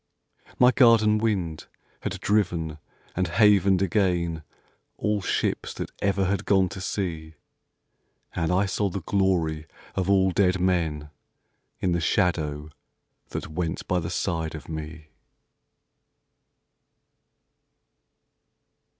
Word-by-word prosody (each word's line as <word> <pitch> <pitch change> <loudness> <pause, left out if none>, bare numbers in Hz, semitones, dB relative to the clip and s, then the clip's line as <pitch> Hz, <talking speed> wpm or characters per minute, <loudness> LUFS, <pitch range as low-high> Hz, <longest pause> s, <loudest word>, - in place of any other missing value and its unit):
My 125 0 +6
garden 110 -4 +5
wind 95 -8 -2 0.3
had - - -4
driven 85 -7 0 0.4
and 95 0 0
havened 100 0 +4
again 90 -5 0 0.6
All 105 -1 0
ships - - -1
that - - -5
ever 100 -1 +1
had 95 0 -1
gone 95 -2 +3
to 95 - -8
sea, 80 -5 -4 1.0
And 80 0 -1
I 95 +3 +2
saw 100 +1 -1
the 95 -1 -5
glory 85 -6 0 0.3
of 95 0 -1
all 95 -1 +4
dead 90 0 +2
men 80 -5 0 0.7
In 90 - +1
the 85 0 0
shadow 75 -3 0 0.6
that - - -5
went 80 +1 -3
by 90 - +1
the 85 0 -4
side 80 -4 -2
of 75 - -9
me. 80 0 -7
90 Hz, 110 wpm, -25 LUFS, 80-100 Hz, 1.0 s, My